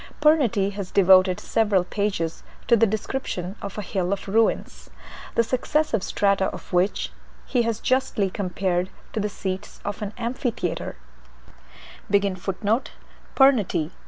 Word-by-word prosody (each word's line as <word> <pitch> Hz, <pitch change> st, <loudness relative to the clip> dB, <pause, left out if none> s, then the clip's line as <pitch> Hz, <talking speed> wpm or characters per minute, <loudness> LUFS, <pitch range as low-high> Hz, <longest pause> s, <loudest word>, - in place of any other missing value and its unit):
Pernety 250 Hz, -10 st, +3 dB
has 200 Hz, -2 st, -6 dB
devoted 185 Hz, -1 st, +5 dB
several 205 Hz, -5 st, +2 dB
pages 185 Hz, -4 st, -2 dB, 0.3 s
to 235 Hz, -, +6 dB
the 225 Hz, 0 st, +4 dB
description 205 Hz, -3 st, -3 dB
of 200 Hz, 0 st, -6 dB
a 210 Hz, -, -3 dB
Hill 185 Hz, -2 st, -2 dB
of 200 Hz, 0 st, -3 dB
Ruins, 220 Hz, +3 st, 0 dB, 0.5 s
the 230 Hz, -, +4 dB
successive 255 Hz, 0 st, 0 dB
strata 200 Hz, 0 st, +1 dB
of -, -, -7 dB
which 180 Hz, +3 st, +1 dB, 0.3 s
he 250 Hz, -, +1 dB
has 230 Hz, -2 st, -1 dB
justly 235 Hz, -7 st, +1 dB
compared 185 Hz, -2 st, -1 dB, 0.2 s
to -, -, -1 dB
the 210 Hz, 0 st, -1 dB
seats 190 Hz, 0 st, -5 dB
of 205 Hz, +2 st, -4 dB
an 205 Hz, 0 st, -4 dB
amphitheatre. 235 Hz, -6 st, -3 dB
200 Hz, 120 wpm, -24 LUFS, 190-230 Hz, 0.5 s, to